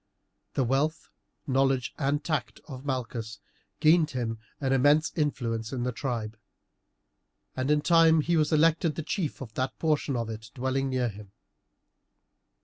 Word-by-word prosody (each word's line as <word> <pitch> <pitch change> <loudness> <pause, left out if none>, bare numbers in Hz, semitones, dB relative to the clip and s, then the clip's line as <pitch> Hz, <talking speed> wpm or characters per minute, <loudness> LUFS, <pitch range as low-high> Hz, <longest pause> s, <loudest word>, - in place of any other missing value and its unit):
The 135 - +2
wealth, 140 +6 0 0.4
knowledge, 135 -2 +1
and 145 +1 0
tact 120 -9 -2
of 130 -3 -8
Malchus 120 -5 -4 0.4
gained 155 +1 +5
him 115 -4 -3 0.2
an 135 -2 0
immense 145 +4 +4
influence 115 -7 -1
in 125 -3 -2
the 125 - 0
tribe, 115 -4 -4 1.2
and 130 +1 -1
in 150 0 +3
time 165 -1 +5
he 170 +3 +1
was 155 -1 +2
elected 160 0 +3
the 160 - -4
chief 155 -1 -3
of 115 -5 -8
that 130 +3 -2
portion 150 -3 0
of 115 -2 -2
it 110 0 -7
dwelling 130 +1 -1
near 125 -2 0
him. 100 -1 -12
135 Hz, 145 wpm, -28 LUFS, 120-150 Hz, 1.2 s, gained